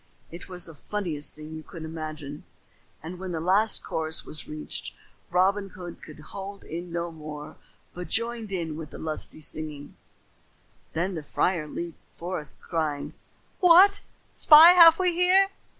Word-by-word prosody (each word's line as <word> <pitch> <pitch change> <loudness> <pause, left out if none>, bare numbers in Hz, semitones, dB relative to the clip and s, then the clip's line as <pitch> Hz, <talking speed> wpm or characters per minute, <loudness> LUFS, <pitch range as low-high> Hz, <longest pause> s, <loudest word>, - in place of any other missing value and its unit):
It 170 +3 -9
was 180 -1 -7
the 165 - -10
funniest 160 -2 -4
thing 155 +1 -10
you 160 - -7
can 160 0 -9
imagine, 155 -2 -7 0.6
and 175 +3 -7
when 185 -1 -5
the 165 - -2
last 195 +6 +2
chorus 160 0 -1
was 155 - -7
reached 150 0 -6 0.3
Robin 195 +3 +2
Hood 180 -2 -10
could 155 -1 -12
hold 200 0 -7
in 170 +2 -7
no 170 0 -3
more 150 -2 -9 0.4
but 180 0 -7
joined 230 -2 -3
in 165 -5 -3
with 155 -1 -7
the - - -10
singing - - -8 0.8
lustily. - - -17 1.0
Then 175 +4 -1
the 160 - -4
friar 160 +2 -1
leaped 170 +2 -7 0.2
forth, 170 -3 -5
crying, 155 -4 -3 0.5
"What 370 +3 +7 0.3
spy 315 +2 +9
have 335 -2 +8
we 365 -2 +2
here?" 370 +3 +4
175 Hz, 150 wpm, -26 LUFS, 155-205 Hz, 1.0 s, spy